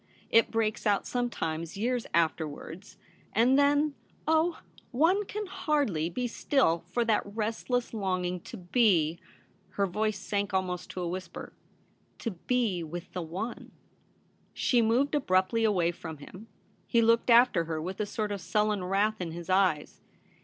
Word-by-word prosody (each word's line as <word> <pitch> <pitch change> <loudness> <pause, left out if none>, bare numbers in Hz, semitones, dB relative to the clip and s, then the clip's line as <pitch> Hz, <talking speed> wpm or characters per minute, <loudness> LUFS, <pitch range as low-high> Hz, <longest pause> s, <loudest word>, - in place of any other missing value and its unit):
It 230 - +5
breaks 225 0 -1
out 205 -1 +2
sometimes 170 -9 -3
years 240 +3 -1
after 160 -1 +1
wards; 185 +6 -10 0.4
and 240 +5 +4
then 285 +1 +3 0.2
— - - -34
oh! 320 +2 +2 0.3
one 340 +10 +2
can 420 +2 -4
hardly 285 - 0
be 245 +8 -3
still 230 - +1
for 235 +6 0
that 220 -2 +3
restless 225 +4 -2
longing 185 -4 -1
to 230 - -10
be 175 -5 +2 0.2
' - - -31
— - - -37
her 200 - +3
voice 210 +3 -1
sank 200 0 -2
almost 180 -2 -2
to 185 - -5
a 175 - -2
whisper 185 +2 -6 0.2
— - - -37
' - - -39
to 230 - -1
be 205 -1 -1
with 170 +2 -7
the 185 +6 -5 0.9
She 245 -2 +3
moved 240 +6 +2
abruptly 210 -5 +2
away 180 -6 +2
from 160 -2 -8
him. 185 +9 -12 0.4
He 230 -1 +3
looked 230 +2 +3
after 235 -7 +5
her 160 -1 -3
with 185 +4 -5
a 210 - -1
sort 210 0 -3
of 200 -2 -4
sullen 210 +2 0
wrath 200 +3 +1
in 165 -2 -4
his 170 +2 -6
eyes. 185 -6 +1
205 Hz, 165 wpm, -29 LUFS, 180-240 Hz, 0.9 s, It